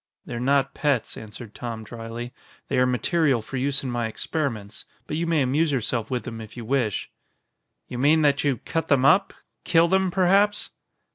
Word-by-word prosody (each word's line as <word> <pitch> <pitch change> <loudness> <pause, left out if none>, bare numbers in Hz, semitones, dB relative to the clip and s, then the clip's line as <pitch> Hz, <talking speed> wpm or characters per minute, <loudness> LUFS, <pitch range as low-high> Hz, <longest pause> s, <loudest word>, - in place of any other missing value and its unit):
"They're 120 - -5
not 135 +2 +2
pets," 140 -6 0
answered 110 0 -10
Tom 115 -2 -6
dryly, 115 +2 -7 0.4
"they 135 - +1
are 125 - +4
material 130 0 +1
for 130 - -6
use 135 +2 0
in 130 - -3
my 120 -1 -1
experiments. 110 -4 -4 0.2
But 150 - -4
you 170 +2 -1
may 160 -4 +2
amuse 145 +5 +1
yourself 120 -3 -1
with 125 -2 -2
them 115 -2 -7
if 110 +2 -11
you 120 - -6
wish." 120 -4 -1 0.8
"You 120 - -6
mean 155 +4 +4
that 140 -1 +3
you 140 -4 +1
cut 165 +8 -3
them 135 -2 +3
up 190 +7 +5 0.3
kill 170 -1 +4
them, 190 +1 +2
perhaps?" 195 +3 +2
130 Hz, 185 wpm, -24 LUFS, 120-155 Hz, 0.8 s, up